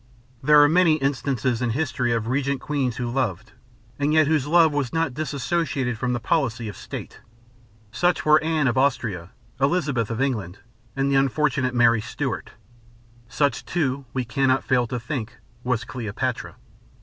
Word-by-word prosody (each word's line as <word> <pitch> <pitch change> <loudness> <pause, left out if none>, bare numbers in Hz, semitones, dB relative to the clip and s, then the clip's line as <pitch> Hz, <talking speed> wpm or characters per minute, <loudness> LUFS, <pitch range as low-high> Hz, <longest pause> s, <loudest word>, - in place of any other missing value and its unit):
There 150 +2 +6
are - - +6
many 165 0 +4
instances 135 -4 -1
in 125 - 0
history 130 -5 -1
of 115 -2 0
regnant 135 +2 -1
queens 135 -5 -2
who 125 - -2
loved 120 -7 -2 0.5
and 145 +1 +1
yet 155 -1 +5
whose 150 -2 +1
love 165 0 +5
was 140 -4 -1
not 165 -5 0
dissociated 140 -2 -2
from 125 +3 -2
the 120 - -1
policy 120 -3 -1
of 105 - -7
state. - - -8 0.7
Such 175 0 +1
were 155 0 +5
Anne 160 -3 +1
of 125 +1 +1
Austria, 115 -10 0 0.3
Elizabeth 140 -6 +1
of 115 0 -3
England, 105 -9 -2 0.4
and 135 +1 0
the 135 - +4
unfortunate 135 -2 +1
Mary 115 -2 +4
Stuart. - - -4 0.8
Such, 145 +3 0
too, 140 -5 -2
we 130 -2 -2
cannot 130 +3 +1
fail 125 -2 +1
to 125 +1 -3
think, 115 -1 -5 0.3
was 125 -3 0
Cleopatra. 115 -5 -4
130 Hz, 160 wpm, -23 LUFS, 120-150 Hz, 0.8 s, There